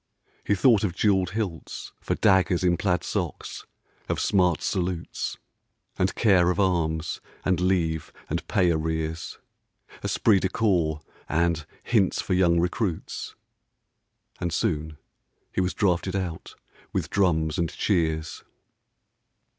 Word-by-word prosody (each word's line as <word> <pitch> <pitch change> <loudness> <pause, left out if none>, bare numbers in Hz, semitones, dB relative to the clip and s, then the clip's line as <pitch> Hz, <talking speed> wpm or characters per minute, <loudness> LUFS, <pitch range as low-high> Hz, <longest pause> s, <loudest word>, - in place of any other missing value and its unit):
He 100 - +2
thought 110 +1 +4
of 90 -5 -1
jewelled 95 -3 +2
hilts 95 -7 -4
For - - -1
daggers 95 -2 +3
in 90 -1 +4
plaid 90 -2 0
socks; - - -4 0.4
of - - 0
smart 90 -5 +2
salutes; 90 -3 -2 0.6
And - - +1
care 95 -6 +4
of 90 - 0
arms; 85 -4 0 0.2
and 90 -2 +2
leave; 85 -4 0 0.2
and - - -3
pay 90 -2 +3
arrears; 80 0 -2 0.7
Esprit 105 -4 +3
de 95 - 0
corps; 85 -8 +1 0.3
and 85 -2 +1 0.2
hints 105 -6 +2
for 95 - -1
young 85 -2 +4
recruits. 90 +1 -2 1.0
And 85 -1 -2
soon, 80 -2 -1 0.5
he - - 0
was 90 0 -1
drafted 95 -1 +1
out 90 -4 -4 0.4
with - - -2
drums 80 -5 +2
and 85 -2 +1
cheers. 80 -5 -1
90 Hz, 125 wpm, -26 LUFS, 80-95 Hz, 1.0 s, thought